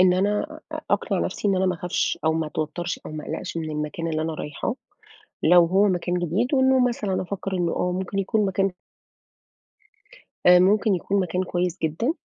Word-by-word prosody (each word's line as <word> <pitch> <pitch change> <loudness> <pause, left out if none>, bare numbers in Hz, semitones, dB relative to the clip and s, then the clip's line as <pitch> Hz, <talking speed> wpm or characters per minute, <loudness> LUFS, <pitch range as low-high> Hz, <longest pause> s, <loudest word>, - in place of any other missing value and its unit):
إن 185 -1 +6
أنا 205 +3 -1
أ - - -4
أقنع - - +1
نَفْسي 205 - -1
إن 195 - +2
أنا 190 0 +2
ما 180 - +1
أخافش 175 +1 -1
أو 160 - +3
ما 160 -1 -1
أتوتّرش 155 +3 -3
أو - - -7
ما 155 -1 -6
أقلَقش 165 +2 -5
من 160 -1 -3
المكان 150 +2 -3
اللي 155 -1 -1
أنا 160 0 -2
رايحاه 150 - -4 0.7
لو 175 -1 +6
هو 195 +4 +3
مكان 180 -1 -1
جديد، 180 - 0
وإنه 260 -1 +4
مثلًا 205 -6 -2
أفكّر 195 +1 -5
إنّه 175 -2 0
آه، 180 0 0
ممكن 190 +2 -3
يكون 205 +1 +1
مكان 195 +1 +1 1.8
آآ 180 0 +8
ممكن 200 +2 +3
يكون 195 +3 -1
مكان 185 0 -1
كويس 180 -1 -2
جدًا. 165 - 0
180 Hz, 185 wpm, -24 LUFS, 165-195 Hz, 1.8 s, آآ